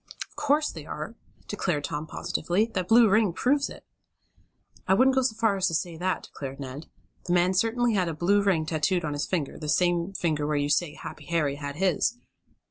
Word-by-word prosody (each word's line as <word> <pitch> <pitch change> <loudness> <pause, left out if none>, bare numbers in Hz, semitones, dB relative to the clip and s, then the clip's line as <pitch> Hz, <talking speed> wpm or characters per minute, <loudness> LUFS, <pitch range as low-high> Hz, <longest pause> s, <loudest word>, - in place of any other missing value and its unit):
"Of - - -26
course 295 +1 +1
they 155 -3 -9
are!" 155 +9 -5 0.3
declared 175 -7 -1
Tom 150 +2 -4
positively. 175 +6 0
"That 185 -2 -1
blue 230 +2 +7
ring 210 -2 +3
proves 280 - +1
it!" - - -12 1.0
"I 190 - +5
wouldn't 265 +4 +5
go 265 - +4
so 250 -4 0
far 220 -3 +2
as 185 -1 +2
to 165 - -1
say 170 +1 -2
that," 185 +3 -1
declared 135 -1 -8
Ned. 135 +3 -7 0.4
"The 175 - 0
man 180 +1 +3
certainly 230 +4 +2
had 185 -4 +1
a 165 - -3
blue 195 +6 +3
ring 185 -6 +2
tattooed 160 +2 0
on 150 - -2
his 145 +1 -2
finger 160 -7 -2
the 150 - -5
same 175 +3 +1
finger 155 -5 -1
where 150 - 0
you 145 0 0
say 150 +1 +1
Happy 150 - -9
Harry 150 -3 0
had 145 -1 -5
his. 190 +6 +1
175 Hz, 210 wpm, -27 LUFS, 150-205 Hz, 1.0 s, blue